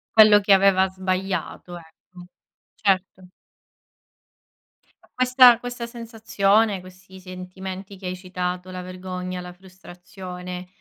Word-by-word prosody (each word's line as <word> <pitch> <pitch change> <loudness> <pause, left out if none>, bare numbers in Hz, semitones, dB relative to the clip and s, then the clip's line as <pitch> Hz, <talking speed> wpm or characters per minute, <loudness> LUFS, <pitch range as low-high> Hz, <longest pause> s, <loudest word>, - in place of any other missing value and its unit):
Quello 215 -1 +8
che 200 0 +3
aveva 190 -1 +4
sbagliato, 185 -1 -4
ecco. 175 +2 -16 0.5
Certo. 185 -2 -1 1.7
Ma - - -25
questa 255 -1 +6
questa 245 -1 -6
sensazione, 220 -3 0
questi 185 +1 -15
sentimenti 185 +1 -8
che 185 -1 -8
hai 180 - -3
citato, 180 0 -5
la 185 0 -6
vergogna, 185 0 -6
la 180 0 -9
frustrazione, 180 0 -10
185 Hz, 105 wpm, -23 LUFS, 180-200 Hz, 1.7 s, Quello